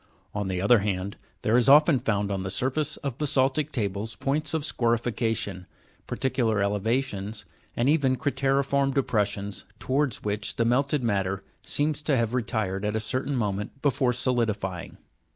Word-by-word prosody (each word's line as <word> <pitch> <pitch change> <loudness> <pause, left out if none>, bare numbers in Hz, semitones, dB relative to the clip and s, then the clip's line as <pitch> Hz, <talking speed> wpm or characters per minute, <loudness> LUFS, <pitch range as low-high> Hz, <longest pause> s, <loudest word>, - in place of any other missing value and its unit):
On 105 -1 -2
the 95 -1 -2
other 105 +5 +5
hand, 100 -1 -2 0.3
there 110 - +2
is 125 +1 +5
often 150 0 +7
found 105 -4 0
on 95 -1 -1
the 95 - -3
surface 135 +9 0
of 135 -3 -3
basa'ltic 145 0 +1
tables 105 -2 -2
points 150 +6 -1
of 160 - -1
scorification, 115 - -1 0.4
par - - -4
ticular 120 -5 +1
elevations, 105 +1 -1 0.3
and 120 - +2
even 140 -4 +3
crate'riform 135 +1 +1
depressions, 105 -6 0
towards 135 -2 -1
which 105 0 -2
the 115 - +1
melted 135 +3 +2
matter 100 -3 0 0.2
seems 150 0 -1
to 150 -3 +1
have 115 0 0
retired 110 -5 -1
at 105 +1 -1
a - - +1
certain 130 +5 -2
moment 105 +1 -2
before 130 -3 +2
solidifying. 115 -7 -1
115 Hz, 150 wpm, -26 LUFS, 105-135 Hz, 0.4 s, often